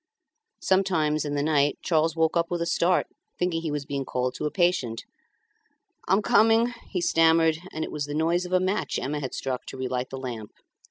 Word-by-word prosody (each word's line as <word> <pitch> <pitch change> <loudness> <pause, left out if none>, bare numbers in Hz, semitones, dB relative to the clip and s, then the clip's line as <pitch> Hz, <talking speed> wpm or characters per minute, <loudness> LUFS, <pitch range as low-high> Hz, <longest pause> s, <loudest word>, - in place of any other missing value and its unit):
Sometimes 165 -6 +1
in 145 0 -2
the 145 - 0
night 145 -2 +2
Charles 165 -1 +1
woke 160 0 +1
up 170 0 +1
with 175 - -2
a 170 - -1
start, 175 +1 +2 0.3
thinking 180 -2 -1
he 165 - -3
was 145 -1 -3
being 140 -1 -3
called 125 -1 -2
to - - -5
a - - -1
patient. 175 -11 0 1.0
"I'm 195 +3 +3
coming," 225 +4 +4 0.2
he 180 - -2
stammered; 165 -1 +3
and 160 - -4
it - - -5
was 150 -1 -3
the 145 0 -5
noise 165 +3 +1
of - - -12
a 185 - +4
match 190 +3 -1
Emma 150 +2 -2
had 130 -3 -5
struck 130 -2 -3
to - - -7
relight 130 -1 -3
the 135 - -6
lamp. 120 -5 -6
160 Hz, 205 wpm, -26 LUFS, 140-175 Hz, 1.0 s, coming